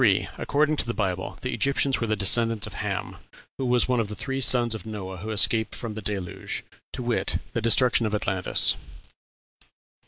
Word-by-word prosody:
According 150 +2 +1
to - - +2
the 115 - -3
Bible, 95 -3 -3
the 130 - -2
Egyptians 140 -1 0
were 115 - -1
descendants 110 +1 +3
of - - -9
Ham, - - -4 0.4
who 135 - -1
was 125 0 +3
one 125 -1 +1
of 115 - 0
the 105 - -6
three 135 +3 -4
sons 120 -3 +4
of 110 -5 -6
Noah 95 -4 -7
who 105 +5 -7
escaped 110 +1 +2
from 115 -3 -6
the 110 - -5
Deluge, 95 -4 -5 0.3
to 125 - -5
wit, 120 -1 0 0.2
the 115 - -1
destruction 115 0 +4
of 105 - -2
Atlantis. 95 -2 +2
115 Hz, 180 wpm, -25 LUFS, 105-125 Hz, 0.4 s, sons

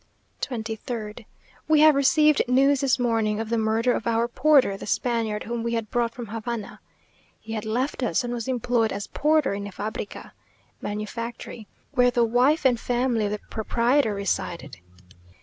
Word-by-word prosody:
23rd. 225 -2 -5 0.4
We 310 -1 +4
have 310 0 +8
received 300 +2 +4
news 270 +2 +3
this 270 -2 +2
morning 225 -4 0
of 225 -1 -4
the 230 - +1
murder 225 +3 +1
of 230 - -3
our 230 0 +1
porter, 270 -4 +3
the 195 - -9
Spaniard 225 -3 -1
whom 235 +1 -4
we 235 0 -2
had 225 -2 -4
brought 235 -1 0
from 240 - -6
Havana. 225 0 -5 0.6
He 220 0 -8
had 215 -1 -4
left 250 +6 -2
us, 230 -7 +1
and 245 0 -3
was 235 -1 -4
employed 240 -3 0
as 205 - -4
porter 305 -5 +1
in 200 0 -4
a - - -8
fabrica 210 +1 -6 0.5
(manufactory), 220 +1 -6 0.2
where 250 -3 +4
the 240 -1 +2
wife 255 +7 +2
and 245 -3 +4
family 240 -2 0
of 205 - -2
the 210 - -3
proprietor 235 +1 +1
resided. 175 -6 -3
235 Hz, 165 wpm, -25 LUFS, 220-250 Hz, 0.6 s, have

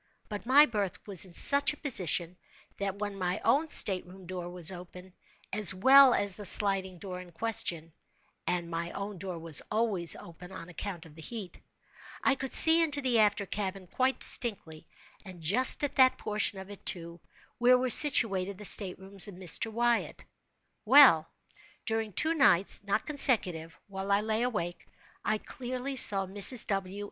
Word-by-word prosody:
But 210 +2 -9
my 285 +4 +5
berth 205 -7 -5
was 195 -3 -3
in 180 - -17
such 285 - +2
a - - -15
position, 180 - -1 0.4
that 200 0 -5
when 205 -1 -7
my 180 +2 -3
own 305 +4 +1
state 190 -10 +5
room 185 +1 -15
door 175 -1 -8
was 175 0 -4
open, 180 0 -13 0.4
as 205 -2 +8
well 265 +5 +5
as 200 -2 0
the 210 - -10
sliding 190 0 0
door 180 0 -9
in 180 -1 -16
question 170 -5 -3 0.5
(and 175 -1 -3
my 170 0 -6
own 200 -1 -8
door 185 -2 -7
was 165 -2 -1
always 210 -6 0
open 180 +2 -14
on 180 -2 -11
account 180 -1 -8
of 160 - -17
the 160 - -14
heat,) 205 0 -8 0.6
I 280 - +2
could 265 -1 -7
see 325 +1 +7
into 295 -3 -1
the 255 -4 -1
after 205 -1 0
cabin 195 -1 -6
quite 255 +8 -3
distinctly, 170 -9 -4 0.4
and 185 -3 -13
just 205 - +1
at 285 0 -2
that 260 -1 +3
portion 210 -1 -2
of 190 +1 -11
it, 205 - -14
too, 170 -1 -3 0.4
where 250 +1 +3
were 255 0 -3
situated 200 -9 +4
the 210 - -5
state 190 -2 +2
rooms 195 +1 -2
of 200 - -12
Mr. 185 +5 -1
Wyatt. 235 +1 -3 0.6
Well, 215 - +5 0.5
during 220 -2 -4
two 315 - -1
nights 200 - +1
(not 200 +2 -3
consecutive) 185 - +2
while 195 0 -7
I 200 +1 +1
lay 220 +1 -3
awake, 210 -8 -5 0.4
I 215 - -2
clearly 255 +4 -8
saw 195 -6 +4
Mrs. 205 +5 +3
W. 195 0 -5
200 Hz, 175 wpm, -27 LUFS, 180-235 Hz, 0.6 s, as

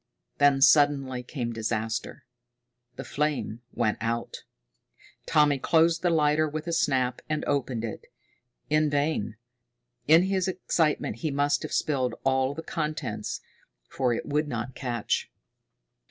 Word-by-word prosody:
Then 140 -1 +5
suddenly 135 -2 +4
came 120 -2 -4
disaster. 110 0 -3 0.7
The 135 - -6
flame 140 -4 -2
went 110 -3 0
out! 115 +1 -2 0.9
Tommy 145 -2 +3
closed 165 +3 +3
the 175 - +2
lighter 155 -1 +2
with 155 +1 -5
a 170 - -3
snap 130 -5 +1
and 155 0 -1
opened 125 -5 -1
it. 110 - -7 0.6
In 155 0 +2
vain. 145 -7 -1 0.7
In 160 +3 +7
his 190 -1 0
excitement 165 - 0
he 155 +6 -2
must 145 0 +1
have - - -6
spilled 130 -4 0
all 130 +1 +1
the 165 - -6
contents, 155 -2 -3 0.5
for 130 -2 0
it 115 - -2
would 150 +1 0
not 120 -1 -4
catch. 120 -4 -2
145 Hz, 130 wpm, -27 LUFS, 125-155 Hz, 0.9 s, In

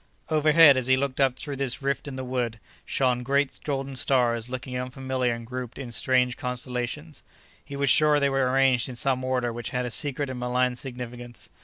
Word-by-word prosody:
Overhead, 155 -2 +6
as 130 -1 0
he 130 0 +4
looked 140 0 -1
up 135 -2 +3
through 140 0 -6
this 135 -1 -1
rift 140 +1 -1
in 140 - -6
the 130 - -5
wood, 125 -3 -2 0.3
shone 125 -2 +1
great 140 +2 0
golden 135 -2 -3
stars 120 -3 +2
looking 130 0 -5
unfamiliar 130 0 -2
and 115 0 -9
grouped 125 0 -6
in 130 -3 -7
strange 125 +1 +1
constellations. 125 +4 -5 0.4
He 140 - -9
was 140 -1 +2
sure 150 -1 +4
they 140 - +2
were 135 -2 +1
arranged 130 -2 +3
in 125 - -7
some 130 +1 +1
order 125 -2 -1
which 120 0 -5
had 125 0 -2
a 120 - -4
secret 140 0 -1
and 125 - -6
malign 125 0 0
significance. 120 -2 -7
130 Hz, 195 wpm, -26 LUFS, 125-135 Hz, 0.4 s, Overhead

